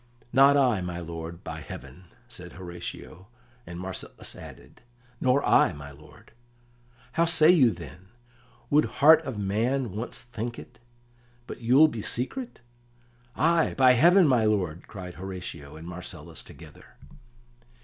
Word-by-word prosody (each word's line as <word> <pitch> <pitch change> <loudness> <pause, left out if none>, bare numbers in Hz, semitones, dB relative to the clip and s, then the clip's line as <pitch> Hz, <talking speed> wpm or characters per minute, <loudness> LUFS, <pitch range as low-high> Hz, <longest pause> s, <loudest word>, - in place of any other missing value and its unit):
"Not 140 +2 +6
I, 125 -8 +2
my 90 -1 -5
lord, 85 0 -7
by 80 -1 -6
heaven!" 70 +5 -10 0.2
said - - -9
Horatio, 90 +1 -9 0.4
and 85 0 -7
Marcellus 95 0 -6
added: - - -13 0.4
"Nor 130 +2 +2
I, - - +4
my 70 -1 -10
lord." 70 +2 -17 0.8
"How 170 - +2
say 165 -1 +6
you 145 -9 +5
then? 85 - -9 0.6
Would 150 +1 +4 0.2
heart 160 +2 +8
of 130 -5 -5
man 115 +5 -1
once 110 +5 -6
think 120 0 -6
it - - -13 0.7
But - - -9
you'll 130 +7 +6
be 115 -8 -5
secret?" 230 - -4 0.7
"Ay, 165 +1 +2
by 130 -1 +6
heaven, 175 +8 +5
my 125 -5 +3
lord!" 90 -6 -1
cried 90 -4 -8
Horatio 90 -6 -8
and 80 +2 -10
Marcellus 85 -2 -7
together. 75 +1 -15
100 Hz, 135 wpm, -26 LUFS, 85-130 Hz, 0.8 s, heart